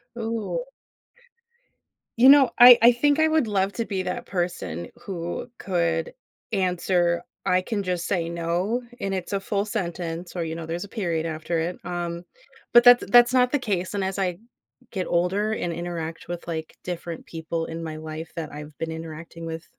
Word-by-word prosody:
Ooh. 230 - -3 1.5
You 255 +3 +8
know, 275 -3 +8
I 245 0 +11
I 235 +1 +8
think 285 +5 +2
I 315 - +5
would 315 -4 +2
love 200 -1 0
to 230 - -2
be 195 -2 -2
that 180 - -4
person 175 - -3
who 175 +5 -5
could 170 -1 -1 0.4
answer 180 -3 +1 0.2
I 180 0 +3
can 205 +2 -2
just 180 -2 -2
say, 175 -4 0
"No," 170 +7 -1 0.2
and 195 - -2
it's 185 0 -4
a 200 - +1
full 200 +1 -1
sentence, 175 -4 -4
or 175 - -1
you 160 -1 -4
know, 165 -1 -6
there's 165 +3 -4
a - - -8
period 170 -8 -2
after 160 +1 -2
it, 170 +2 -2
um 175 -1 -4 0.5
Bbut 240 - +8 0.2
that - - -9
that's 240 0 +7
not 250 -1 +4
the 290 - +2
case, 195 -7 -2
and 200 -1 -1
as 190 +1 -2
I 180 -2 -1 0.5
get 185 -3 -2
older 190 +5 +1
and 175 -5 -2
interact 165 -1 -5
with, 175 0 -6
like, 160 -2 -5
different 175 -2 -6
people 165 0 -4
in 165 0 -6
my 160 -1 -5
life 155 +1 -7
that 160 -3 -5
I've 150 0 -9
been 165 0 -3
interacting 160 +1 -8
with 160 0 -5
175 Hz, 180 wpm, -25 LUFS, 165-205 Hz, 1.5 s, I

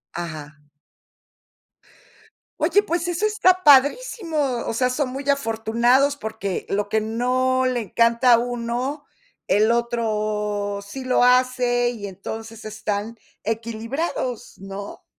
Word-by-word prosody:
Ajá. 155 -3 -7 2.0
Oye, 410 - +3
pues 345 -3 -2
eso 350 +4 0
está 370 -4 +3
padrísimo, 315 - +4 0.3
o - - -2
sea, 250 +2 +1
son 260 +1 -1
muy 270 +2 -5
afortunados, 240 +2 +2
porque 220 -7 -4
lo 205 +1 -1
que 220 +1 0
no 255 +3 +1
le 250 -2 0
encanta 235 +3 +3
a - - +7
uno, 245 +4 -3 0.4
el 210 +4 +3
otro 210 -3 -1
sí 200 +7 -8
lo 250 -1 +3
hace, 250 -1 +3
y 220 -4 -6
entonces 220 +4 -8
están 215 +1 -4 0.3
equilibrados, 230 +4 -3
¿no? 195 +1 -8
235 Hz, 115 wpm, -22 LUFS, 215-260 Hz, 2.0 s, a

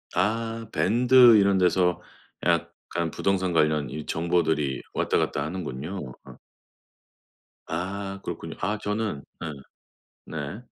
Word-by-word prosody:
아. 115 +4 -1
밴드 120 +2 +6
이런 100 -1 +4
데서 90 -1 +2 0.4
약간 85 -1 -1
부동산 95 -2 0
관련 75 -3 +2
이 75 +3 -6
정보들이 80 -4 0
왔다 - - +1
갔다 70 - 0
하는군요. 80 -2 -5
어. - - -12 1.3
아 95 +3 -4
그렇군요. - - -6
아 105 +1 -1
저는 105 -8 -2 0.2
예. 80 - -3 0.7
네. 75 +8 -6
90 Hz, 210 characters per minute, -26 LUFS, 80-105 Hz, 1.3 s, 밴드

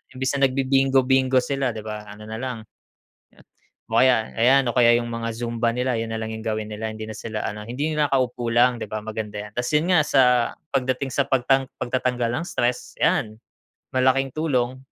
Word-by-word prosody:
imbes 130 +1 -1
na 135 - +5
nagbibingo 135 0 +2
bingo 130 0 +3
sila, 135 -1 -1
'di 110 - -6
ba, 105 -1 -6
ano 105 +1 -11
nalang 115 +1 -5 0.7
ah, - - -19 0.5
o 115 - +3
kaya 125 -4 +3
ayan, 135 +3 +5
o - - -6
kaya 120 -1 +6
'yung 120 0 -2
mga 115 0 -3
zumba 115 0 -1
nila 125 +1 0
'yun 115 - -3
nalang 110 0 -4
'yung 110 +1 -7
gawin 110 -1 -2
nila 110 +1 -4
hindi 110 0 -6
na - - -7
sila 110 -2 -5
ano, 105 +1 -5
hindi 140 +6 -2
'yung 150 - -3
nakaupo 130 -4 0
lang, 120 0 +4
'di - - -4
ba, 110 0 -4
maganda 105 -1 -5
'yan. 105 - -10
Tas 120 - -1
'yun 165 +5 +1
nga 175 - +6
sa 135 -2 +4 0.5
pagdating 130 0 -1
sa 140 - +1
pagtang 135 +1 +2 0.2
pagtatanggal 125 -1 -1
ng 170 - -5
stress, 120 -5 -2
'yan 110 0 +1 0.6
malaking 130 +1 +3
tulong. 130 -5 0
125 Hz, 195 wpm, -23 LUFS, 110-130 Hz, 0.7 s, kaya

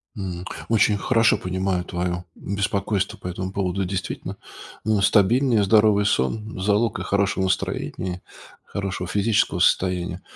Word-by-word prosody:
М, 90 -3 -5 0.2
очень 110 -2 +3
хорошо 115 +1 +3
понимаю 95 0 -1
твоё 90 0 -3
беспокойство 100 0 -2
по - - -8
этому 95 +1 -4
поводу. 95 -1 -1
Действительно, 95 -1 -4 0.5
но 110 -2 +1
стабильнее 115 +3 +4
здоровый 105 0 +4
сон- 105 +7 -1
залог, 105 +3 +1
э, - - -4
хорошего 100 -1 +1
настроения, 95 -1 -2 0.4
хорошего 95 -3 -4
физического 105 -1 +1
состояния. 90 0 +1
100 Hz, 120 wpm, -23 LUFS, 90-105 Hz, 0.5 s, стабильнее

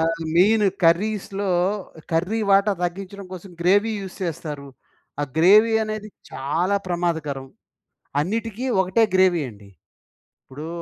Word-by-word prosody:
ఆహ్, 165 0 0 0.2
main 210 +4 +5 0.2
కర్రీస్‌లో, 195 +3 +1 0.6
curry 180 +7 0
వాటా 200 +1 +4
తగ్గించడం 195 +2 -4
కోసం, 185 +1 -9
గ్రేవీ 205 +6 +3
యూజ్ 190 -1 -8
చేస్తారు. 150 -4 -5 0.5
ఆ - - +1 0.2
గ్రేవీ 210 +7 +6
అనేది 215 0 -5 0.2
చాలా 165 +9 0
ప్రమాదకరం 160 -6 -2 0.7
అన్నిటికి 225 - -3
ఒకటే 190 +5 +2
గ్రేవీ 185 -3 +4
అండి. 105 -2 -16 0.8
ఇప్పుడు 145 +4 -8
185 Hz, 110 wpm, -23 LUFS, 165-205 Hz, 0.8 s, గ్రేవీ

